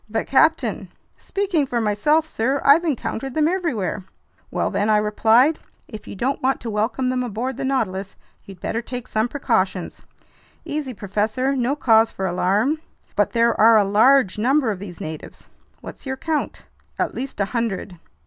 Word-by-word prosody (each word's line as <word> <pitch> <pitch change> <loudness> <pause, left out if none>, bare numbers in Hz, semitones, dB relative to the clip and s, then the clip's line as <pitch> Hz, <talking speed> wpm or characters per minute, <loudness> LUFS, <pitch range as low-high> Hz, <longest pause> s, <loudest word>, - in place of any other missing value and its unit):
"But 225 +1 -2
captain—" 315 +4 +2 0.3
"Speaking 380 -8 -1
for 240 -2 -1
myself, 230 +9 +2
sir, 270 -1 -1
I've 295 +5 +6
encountered 270 -4 -3
them 310 -1 +3
everywhere." 270 - -2 0.5
"Well - - -1
then," 205 +2 0
I 215 - +5
replied, 225 +7 +3 0.3
"if 215 -2 -10
you - - -7
don't 260 +7 -1
want 265 +1 +1
to 230 - -4
welcome 225 +5 -1
them 255 0 0
aboard 245 +2 -3
the - - -5
Nautilus, 200 -8 -2 0.3
you'd 195 -2 -12
better 230 - -2
take 245 0 -7
some 220 +2 0
precautions!" 200 -9 -1 0.6
"Easy, 290 -5 -4
professor, 215 +7 -1
no 260 +2 0
cause 225 -5 +4
for 190 - -4
alarm." 200 - +1 0.4
"But - - +2
there 235 0 +2
are 225 0 +7
a 210 - +5
large 215 +1 +4
number 260 +1 +2
of 195 - -5
these 185 -4 -9
natives." 155 -1 -8 0.4
"What's - - -10
your 265 0 -3
count?" 315 +2 -3 0.3
"At - - -1
least 265 -2 -6
a 200 - +2
hundred." 205 -6 -3
235 Hz, 170 wpm, -22 LUFS, 210-275 Hz, 0.6 s, are